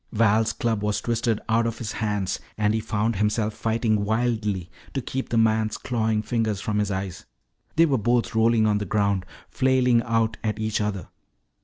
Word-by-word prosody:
Val's 110 0 +3
club 110 -1 -1
was 105 -1 0
twisted 115 0 0
out 115 +1 +2
of 115 - -3
his 110 -3 -4
hands, 105 -3 -2 0.2
and 105 0 +2
he 110 - +1
found 110 0 -1
himself 105 +1 0
fighting 110 -1 0
wildly 110 -4 0 0.3
to - - +1
keep 130 +1 -4
the 115 - 0
man's 110 -1 +2
clawing 110 -3 -1
fingers 110 -2 -1
from 105 0 -1
his 105 -1 0
eyes. 95 -2 -4 0.5
They 165 - +6
were 135 -6 +1
both 120 +2 +1
rolling 110 0 +3
on 105 -1 +2
the 105 - -3
ground, 100 -2 0 0.2
flailing 130 -3 +3
out 115 -1 0
at 105 -2 -1
each 110 -1 -1
other. 105 -3 -3
110 Hz, 180 wpm, -24 LUFS, 105-115 Hz, 0.5 s, They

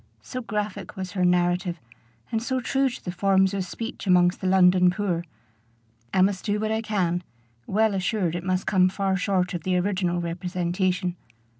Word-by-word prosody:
so 255 - -5
graphic 210 -3 -4
was 185 -1 -5
her 185 -3 -1
narrative, 175 0 +1 0.5
and 225 - 0
so 260 +2 -1
true 270 +2 +1
to 240 - -10
the 180 - -2
forms 190 +1 +2
of 195 -1 -1
speech 225 +4 -6
amongst 180 -1 +4
the 190 - -1
London 180 -1 +5
poor. 180 -2 -1 0.9
I 185 - +4
must 190 -1 0
do 210 0 0
what 215 0 -1
I 220 0 0
can, 185 -6 0 0.5
well 215 +1 +2
assured 185 -2 0
it 175 - -4
must 185 0 -1
come 185 -2 +4
far 190 0 0
short 185 -1 0
of 175 - -3
the 185 +2 0
original 180 -2 0
representation. 180 +1 -1
185 Hz, 175 wpm, -25 LUFS, 180-205 Hz, 0.9 s, London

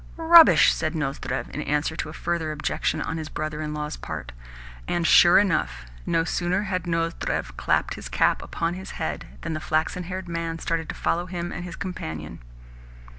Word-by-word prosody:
"Rubbish!" 330 0 +8
said 155 +1 -2
Nozdrev 135 -3 -3
in 150 - -4
answer 150 +2 -1
to 155 - -4
a - - -8
further 165 -2 -2
objection 150 0 -1
on 160 - -3
his 155 -1 -5
brother 155 0 -4
in 150 -1 -3
law's 150 0 -4
part. - - -6 0.6
And, 175 -1 0
sure 175 0 +7
enough, 160 - +1 0.2
no 165 0 +2
sooner 180 +3 0
had 185 -3 -3
Nozdrev 165 - -2
clapped - - 0
his - - -8
cap - - +2
upon 165 0 -2
his 190 +1 -8
head 160 - -3
than 165 - -3
the 155 - -3
flaxen 160 +3 -1
haired 185 +1 -5
man 165 -1 -3
started 165 -1 -2
to - - -4
follow 175 +1 -1
him 175 -1 -4
and 175 - -5
his 175 -1 -7
companion. 80 - -6
165 Hz, 180 wpm, -25 LUFS, 155-175 Hz, 0.6 s, Rubbish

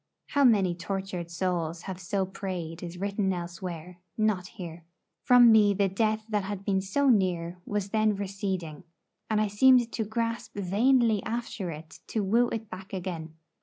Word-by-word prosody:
How 285 -1 +2
many 200 -8 +4
tortured 185 -1 -4
souls 170 -2 -2
have 190 -1 -6
so 195 +1 -1
prayed 180 -3 -5
is 175 0 -7
written 200 +1 -1
elsewhere, 175 0 -6 0.2
not 215 -4 +1
here. 170 -3 -9 0.4
From 245 -2 +7
me 210 -2 +5
the 200 0 +2
death 215 +2 0
that 210 -2 0
had 200 -1 -5
been 190 -1 +1
so 275 +9 0
near 180 -5 +1
was 205 -1 -2
then 215 -1 +2
receding, 190 -5 -4 0.5
and 215 -1 +2
I 215 - +2
seemed 240 +3 +5
to 225 - -2
grasp 230 +2 -3
vainly 220 +3 +3
after 225 -5 -4
it 160 0 -9
to 220 - -1
woo 235 +5 +3
it 225 -1 -4
back 190 +1 -10
again. 170 -4 -5
195 Hz, 165 wpm, -28 LUFS, 180-215 Hz, 0.5 s, From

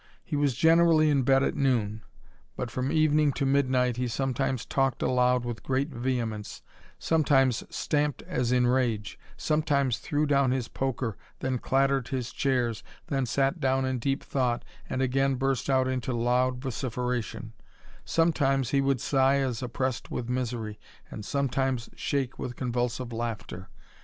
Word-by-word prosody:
He 155 - -4
was 145 -3 +1
generally 165 0 +5
in 140 -2 +3
bed 135 +1 +4
at - - +1
noon; 115 -6 0 0.5
but 125 -2 -4
from 130 +3 -2
evening 155 -2 +3
to 140 - -1
midnight 130 -3 +2
he 125 0 -1
sometimes 130 0 -1
talked 135 -2 0
aloud 125 -1 +2
with 120 -2 -4
great 135 +3 -1
vehemence^ 120 -4 -3 0.3
sometimes 135 -6 +2
stamped 150 -1 -1
as 125 -1 -1
in 125 -1 +3
rage, 120 -4 0 0.2
sometimes 145 -5 +1
threw 150 +1 0
down 140 -2 +3
his 125 -2 -1
poker, 130 -4 -3 0.2
then 130 -1 -2
clattered 135 -1 +1
his 125 -2 -3
chairs, 125 -5 0 0.3
then 135 -3 0
sat 135 +7 +1
down 135 -2 +1
in 130 -1 -1
deep 135 +4 -1
thought, 125 -3 -1 0.2
and 130 - 0
again 135 +1 +1
burst 135 0 -1
out 130 -1 +3
into 130 -1 -2
loud 125 +2 +1
vociferation; 125 -3 -3 0.5
som^' 165 0 +2
times 135 -4 +1
he 140 - +3
would 135 -2 +1
sigh 135 +1 +3
as 130 -4 -1
oppressed 130 0 -2
with 120 - -4
misery, 120 -4 -3 0.3
and 110 - -7
sometime^ 135 -1 0 0.2
shake 135 -3 -2
with 125 - -4
convulsive 125 -1 -2
laughter. 115 -5 -5
130 Hz, 150 wpm, -28 LUFS, 125-135 Hz, 0.5 s, generally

